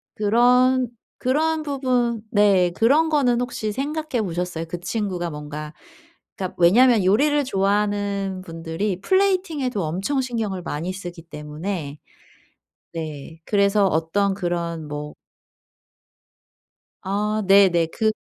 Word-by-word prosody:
그런 250 +4 +3 0.3
그런 310 +5 +1
부분 255 -5 0
네. 195 -4 +4
그런 285 - +3
거는 255 -6 +2
혹시 225 -3 -3
생각해 290 0 -2
보셨어요? 175 -2 -3
그 175 +2 -5
친구가 180 -2 -3
뭔가 150 0 -7 0.6
그러니까 185 -1 -5
왜냐하면 225 +5 +5
요리를 290 +9 +3
좋아하는 200 -2 0
분들이 165 +4 -3
플레이팅에도 335 - +1
엄청 195 - -1
신경을 220 -7 -3
많이 165 +3 -3
쓰기 175 -3 -8
때문에 150 0 -6 0.9
네. 160 -1 -7
그래서 200 0 +3
어떤 190 +5 +1
그런 170 -4 -3
뭐 150 0 -6 1.9
아 210 +3 -1
네네. 190 -4 +5
그 220 +5 0
200 Hz, 245 characters per minute, -22 LUFS, 170-245 Hz, 1.9 s, 왜냐하면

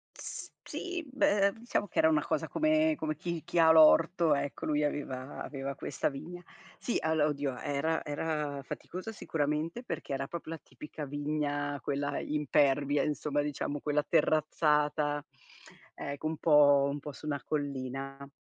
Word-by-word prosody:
S - - -7
sì, 360 -2 -4
beh, 200 -7 +3
diciamo 225 -3 -2
che - - -12
era 160 - +6
una 150 -2 +2
cosa - - -1
come 310 0 +3
come 155 -1 -2
chi 170 +1 -4
chi - - -3
ha 160 0 +7
l'orto, 160 0 +6
ecco, 140 0 -3
lui 150 -1 +1
aveva 140 -2 -3
aveva 135 -1 -5
questa 145 - -2
vigna. 165 +6 -8 0.3
Sì 240 - -1
allo 160 -1 +2
oddio, 140 -3 -2
era 150 +3 -1
era 150 -1 -2
faticosa 185 +9 -6
sicuramente 160 - -2
perché 190 - -5
era 135 0 -2
proprio 170 -1 -6
la 165 - -4
tipica 150 0 -8
vigna, 145 0 -2
quella 145 0 -1
impervia, 145 -1 +2
insomma, 145 -1 0
diciamo, 145 0 -3
quella 150 0 0
terrazzata, 150 -1 +2 0.7
ecco 145 +2 -4
un 160 -1 -3
po' 145 -3 +6
un 145 - -4
po' 150 - -7
su 150 - -11
una 145 -3 -2
collina. 135 -1 -4
150 Hz, 155 wpm, -31 LUFS, 145-160 Hz, 0.7 s, ha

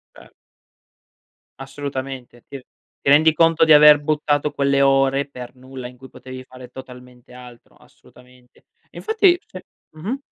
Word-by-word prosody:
Cer - - -17 1.3
Assolutamente. 135 -3 -8
Ti 140 - -9
r 130 - -16 0.4
ti - - -2
rendi 155 +2 +4
conto 165 0 +2
di 160 - +3
aver 150 -1 +7
buttato 150 -1 -1
quelle 140 0 0
ore 135 0 +2
per 125 -1 -11
nulla 130 -1 -10
in 125 - -15
cui 130 +1 -15
potevi 130 0 -11
fare 130 -1 -14
totalmente 125 -1 -14
altro. 125 -1 -15
Assolutamente. 125 0 -23 0.3
Infatti 400 -5 +1
c'è 450 - -11 0.4
mh-mh. 205 - -5
135 Hz, 140 wpm, -20 LUFS, 125-150 Hz, 1.3 s, aver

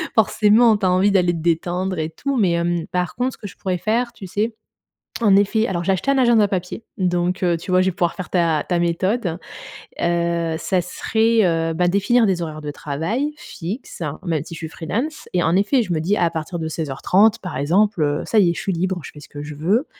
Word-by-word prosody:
Forcément, 220 +1 +4
tu 205 - -2
as 185 - +3
envie 185 +3 +3
d'aller 180 -3 +3
te 165 - -4
détendre 175 +3 -1
et 160 0 -2
tout, 275 +9 -3
mais 195 -6 +3
hem, 170 0 0
par 180 -1 -2
contre 250 +1 -1
ce - - -13
que 205 - -7
je 185 - -12
pourrais 185 -2 -2
faire, 235 +5 0
tu 200 -5 -9
sais, 215 +5 -1 0.7
en 205 -4 +5
effet, 210 +3 +2
alors 175 -2 -2
j'ai 195 - +1
acheté 190 +8 -1
un 275 - +3
agenda 235 -5 +4
papier, 185 +3 -4
donc, 180 -1 0
heu, 175 -1 +3
tu 165 +4 -8
vois, 185 0 +4
je 185 - +2
vais - - -2
pouvoir 175 -2 -1
faire 185 - -7
ta 165 -4 +2
ta 175 -2 +1
méthode. 175 +2 0 0.6
Heu 170 -1 0
ça 185 +1 0
serait, 225 +5 +1
heu 165 -2 +1
bah, 175 +2 +1
définir 220 +6 +3
des 185 -3 0
horaires 155 -2 -5
de 150 - -4
travail 170 - -3
fixes 195 - -7 0.2
même 165 -5 -1
si 165 - -9
je - - -8
suis 160 - -5
freelance 235 - -4
et 180 - +2
en 165 - +2
effet 210 +7 +3
je 190 -5 -3
me 160 - 0
dis 190 +6 +1
à 170 -3 +2
partir 165 +1 -4
de 160 - -3
16:30 170 +9 +2
par 180 -7 -6
exemple, 180 +7 +2
heu, 145 0 0
ça 225 - +2
y 180 -4 +4
est, - - -1
je - - -5
suis 195 - -2
libre, 180 +1 -1
je - - -9
fais 150 - -12
ce 145 - -14
que 145 - -8
je 150 0 -7
veux, 195 - +1
180 Hz, 240 wpm, -21 LUFS, 170-210 Hz, 0.7 s, en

